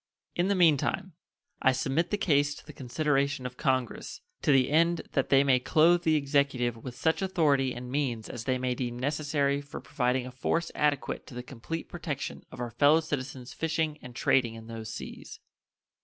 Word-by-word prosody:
In 175 +1 +1
the 200 - +2
mean 165 -5 +5
time, 185 +6 -2 0.5
I 130 - +4
submit 135 +6 0
the 205 - 0
case 145 -5 +2
to - - -13
the 150 - -11
consideration 140 0 0
of 125 0 -5
Congress, 130 -3 -1 0.2
to - - +3
the 135 0 +4
end 170 +2 +3
that 135 - 0
they 135 0 +6
may 130 -2 +4
clothe 165 +6 +4
the 160 -2 +3
Executive 140 -4 +1
with 120 +2 -8
such 160 +7 +1
authority 150 -9 +2
and 125 0 -7
means 125 -6 -1
as 115 -1 -7
they 130 -1 +1
may 125 0 -1
deem 120 -1 -3
necessary 145 +1 0
for 145 -1 -8
providing 125 +1 -1
a 130 - -7
force 165 +6 -1
adequate 145 -2 -1
to 125 - -11
the 125 - -5
complete 135 +6 -6
protection 155 -5 -5
of - - -10
our 120 -1 -3
fellow 145 +7 +5
citizens 135 -4 -5
fishing 160 -1 -1
and 125 -1 -11
trading 120 -3 +2
in 115 0 -10
those 115 -1 -7
seas. - - -8
140 Hz, 190 wpm, -29 LUFS, 125-155 Hz, 0.5 s, they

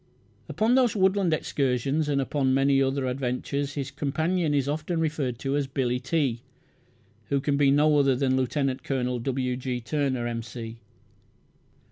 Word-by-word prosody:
Upon 220 +3 +1
those 250 -4 +3
woodland 190 -2 +2
excursions 140 0 0
and 140 -1 +1
upon 135 -1 +1
many 135 0 +3
other 135 0 0
adventures 135 +2 -2
his 135 -2 -3
companion 160 +3 0
is 140 -2 +1
often 155 +3 -2
referred 150 -6 -1
to 135 +3 -2
as 145 -2 0
"Billy 125 -2 -1
T.", 130 -3 -1 0.9
who 140 - +2
can 140 +1 0
be 140 -1 +4
no 150 +2 +4
other 135 -2 +3
than 130 0 +1
Lieut. 130 +1 -1
Col. 125 -2 -1
W. 125 0 -1
G. 125 -1 -3
Turner, 130 -1 -1
"M.C." 115 -1 -6
135 Hz, 150 wpm, -26 LUFS, 130-150 Hz, 0.9 s, be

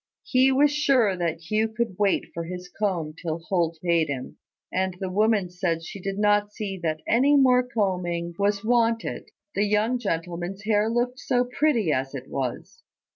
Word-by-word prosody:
He 260 +1 +3
was 285 +2 +4
sure 265 -9 +3
that 170 -2 -2
Hugh 215 +1 +2
could 220 -2 -3
wait 200 -2 +1
for 170 0 -4
his 180 +1 -7
comb 175 -6 -2
till 160 -2 -2
Holt 170 -1 -1
paid 170 -2 +2
him, 135 -3 -5 0.4
and 185 -1 -1
the 190 -2 -3
woman 210 -2 +2
said 170 -2 -1
she 195 - -8
did 195 +1 -3
not 205 0 +2
see 205 -3 -4
that 155 -2 -2
any 270 +5 +4
more 255 -2 +5
combing 180 -8 -2
was 200 +1 +1
wanted: 230 -1 +1 0.2
the 205 - +1
young 215 +4 +1
gentleman's 175 -1 -3
hair 215 0 +2
looked 245 +2 -1
so 250 -1 +1
pretty 245 - +1
as 135 0 -1
it 130 -1 -7
was. 135 - -5
200 Hz, 175 wpm, -25 LUFS, 170-230 Hz, 0.4 s, more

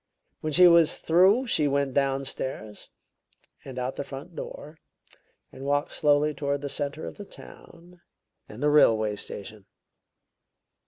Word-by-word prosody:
When 155 - -3
she 180 +4 +7
was 170 -2 +5
through 190 +10 +3
she 155 - +2
went 140 -1 0
downstairs, 135 -5 -3 0.7
and 130 -2 -9
out 125 0 -2
of - - -9
the - - -3
front 140 +6 -10
door, 150 +2 -9 0.7
and 130 - -11
walked 145 +1 0
slowly 150 0 +2
toward 140 -1 -2
the 145 - -4
center 145 +2 -4
of - - -8
the 205 - -7
town 175 -2 -14 0.5
and 110 +6 -8
the 150 - +3
railway 110 -7 +4
station." 100 0 -8
145 Hz, 145 wpm, -26 LUFS, 135-160 Hz, 0.7 s, she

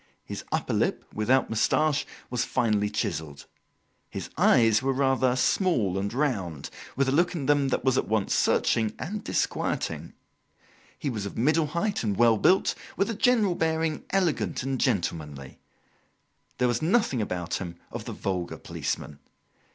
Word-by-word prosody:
His - - -6
upper - - -1
lip, - - 0
without 125 +5 +2
moustache, 145 +6 +2 0.2
was 125 -1 0
finely 105 -5 +1
chiselled. 80 -10 -3 0.6
His - - -6
eyes 115 -1 +4
were 135 0 +1
rather 130 -1 +2
small 125 - +1
and 100 +1 -2
round, 100 - -2 0.2
with 140 0 +1
a - - +2
look 175 +5 +2
in 145 -5 -3
them 145 0 +3
that 135 - -1
was 130 -1 +3
at - - -3
once 110 -2 0
searching 110 -2 +2
and 205 +5 -5
disquieting. - - -2 0.8
He 140 - -2
was 105 -4 -3
of - - -9
middle 155 +6 +2
height 170 +7 -1
and 105 -3 -1
well 115 -2 +5
built, 185 - +4 0.2
with 200 +3 +1
a - - -2
general 215 -3 +3
bearing 160 -1 -1
elegant 180 -9 0
and 135 -1 -2
gentlemanly. 75 - -2 1.0
There 125 - +2
was 120 -1 0
nothing 160 - +2
about 90 -4 -3
him 85 -2 -5 0.2
of - - -6
the - - -5
vulgar 90 -3 -3
policeman. 75 -1 -4
125 Hz, 155 wpm, -27 LUFS, 100-155 Hz, 1.0 s, well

